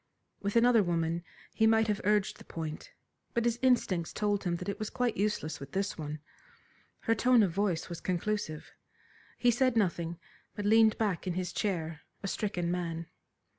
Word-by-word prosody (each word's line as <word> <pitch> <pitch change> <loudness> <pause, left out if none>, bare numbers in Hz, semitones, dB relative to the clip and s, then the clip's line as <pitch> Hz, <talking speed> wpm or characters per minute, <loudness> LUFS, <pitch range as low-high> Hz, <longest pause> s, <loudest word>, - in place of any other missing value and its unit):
With 200 +2 -2
another 235 -1 +6
woman 170 -2 0 0.3
he 220 - +3
might 225 0 +4
have 210 -1 0
urged 210 0 +1
the - - -11
point, 160 -2 -6 0.4
but 235 0 +1
his 235 0 +1
instincts 215 -10 +2
told 205 -1 0
him 175 -1 +1
that 180 +2 -6
it 200 - -3
was 215 - -3
quite 245 -2 0
useless 175 -7 -1
with 140 - -10
this 195 +1 -1
one. 150 -1 -5 0.8
Her 225 - +2
tone 240 +1 +5
of 190 - +1
voice 185 -2 0
was 170 -1 -7
conclusive. 185 -3 -2 0.7
He 245 - +4
said 255 0 +2
nothing, 170 -4 0 0.4
but 205 - -4
leaned 220 +1 +5
back 200 -4 -1
in 175 - -1
his 185 -1 -2
chair 165 -6 -2 0.2
a - - -1
stricken 180 -4 -1
man. 170 -2 -2
200 Hz, 175 wpm, -31 LUFS, 170-220 Hz, 0.8 s, another